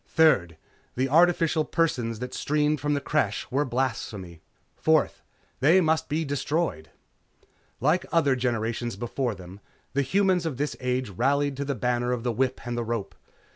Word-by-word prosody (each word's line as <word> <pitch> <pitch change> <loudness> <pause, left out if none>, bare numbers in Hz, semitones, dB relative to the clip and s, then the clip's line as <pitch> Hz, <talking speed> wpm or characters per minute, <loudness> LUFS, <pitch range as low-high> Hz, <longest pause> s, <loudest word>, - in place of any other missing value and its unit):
Third, 100 - +3 0.4
the 130 +2 +1
artificial 165 0 +4
persons 125 -10 0
that 125 +2 -6
streamed 150 0 +1
from 145 +1 +1
the 140 - -1
Creche 140 -9 0
were 140 +3 +1
blasphemy. 115 - -3 0.3
Fourth, 160 -2 +2 0.4
they 160 +8 +5
must 160 -2 +1
be 155 +2 0
destroyed. 145 - -2 0.9
Like 155 +8 +1
other 145 -5 +3
generations 120 -2 -2
before 120 +2 -2
them, 95 +1 -11 0.3
the 140 - +2
humans 185 +3 +2
of 140 -6 -4
this 145 +2 -2
age 125 -3 -1
rallied 140 +7 +1
to 140 - -2
the 140 -1 -2
banner 125 +1 0
of 120 -2 -3
the 125 - 0
whip 130 +3 -1
and 120 0 -3
the 120 - -1
rope. 115 -4 -3
130 Hz, 160 wpm, -26 LUFS, 120-150 Hz, 0.9 s, they